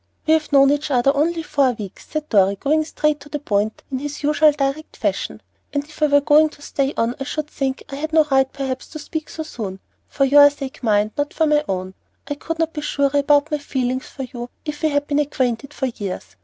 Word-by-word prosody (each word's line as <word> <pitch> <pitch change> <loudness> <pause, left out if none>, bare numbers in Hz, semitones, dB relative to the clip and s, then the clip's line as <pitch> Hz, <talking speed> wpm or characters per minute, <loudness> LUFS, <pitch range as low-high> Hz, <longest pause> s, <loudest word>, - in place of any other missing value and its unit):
"We 315 - +4
have 315 -1 +1
known 275 -1 +6
each 290 +1 -1
other 275 +1 +3
only 325 +3 +1
four 280 -4 +2
weeks," 205 -4 -9
said 310 -1 -3
Dorry, 200 -2 +4
going 305 +9 +1
straight 300 -1 0
to 290 - -14
the 295 - -2
point 215 -6 -1
in 260 - -1
his 290 +2 -6
usual 300 +1 +5
direct 285 +2 -3
fashion; - - -2 0.3
"and 285 -1 0
if 305 +1 -16
I 305 - +5
were 285 0 +4
going 300 +2 +5
to 295 - -18
stay 275 -1 -1
on 230 +1 +1
I - - -2
should 305 +2 -3
think 270 -3 -3
I 275 - -7
had 315 +2 -4
no 320 -1 +5
right, 265 0 +3
perhaps, 265 -2 -4
to 310 - -8
speak 310 +1 -5
so 315 - -5
soon, 205 -10 -6 0.3
for 275 - +1
your 285 +1 +8
sake, 275 -2 -8
mind, 215 -2 +2
not 290 +1 -1
for 320 - +3
my 300 -1 +3
own; 185 0 -3 0.3
I - - -1
could 325 +3 -5
not 325 0 0
be 300 - -4
surer 280 -2 +1
about 290 +2 +3
my 300 - 0
feelings 260 -2 -2
for 270 - -7
you 245 -1 -7 0.2
if 300 -1 -5
we 315 - +2
had 285 0 0
been 290 0 0
acquainted 270 -2 -1
for 270 - -3
years. 200 - -5
285 Hz, 235 wpm, -21 LUFS, 260-300 Hz, 0.3 s, your